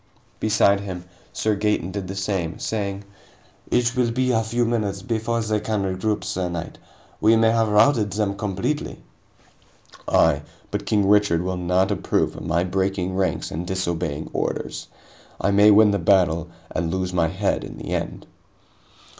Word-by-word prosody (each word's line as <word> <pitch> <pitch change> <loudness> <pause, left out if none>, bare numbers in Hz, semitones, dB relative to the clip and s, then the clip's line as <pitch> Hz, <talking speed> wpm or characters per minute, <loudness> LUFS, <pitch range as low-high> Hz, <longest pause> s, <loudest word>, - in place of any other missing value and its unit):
Beside 105 -2 +3
him, 90 -3 -6 0.3
Sir 110 -1 0
Gaeton 105 -3 0
did 100 -1 -4
the 95 - -5
same, 95 -4 -2
saying: 100 -2 -3 0.7
"It 120 0 +1
will 125 -2 +2
be 130 +2 +1
a 110 -2 +2
few 120 +2 0
minutes 105 -4 -1
before 115 +1 -1
they 110 -1 0
can 105 -1 -1
regroup, 95 +3 -1
sir 90 -1 -2
knight. 85 -2 -6 0.4
We 110 +1 +5
may 115 0 +4
have 115 -1 +2
routed 105 0 +3
them 100 -1 -1
completely." 100 +8 -3 1.0
"Aye. - - +3 0.3
But 105 -1 -3
King 105 -2 +2
Richard 100 -5 +3
will 95 0 -2
not 90 +3 +1
approve 100 - 0
of - - -8
my 85 +2 +1
breaking 95 0 -1
ranks 95 -1 -1
and 85 +3 -4
disobeying 85 -5 -2
orders. - - -3 0.5
I 100 - +1
may 100 +1 +6
win 105 0 +6
the 100 - 0
battle 85 -3 +2 0.2
and 85 - -1
lose 95 -1 -2
my 85 -2 +2
head - - -1
in - - -8
the - - -7
end." - - -3
100 Hz, 165 wpm, -23 LUFS, 90-110 Hz, 1.0 s, may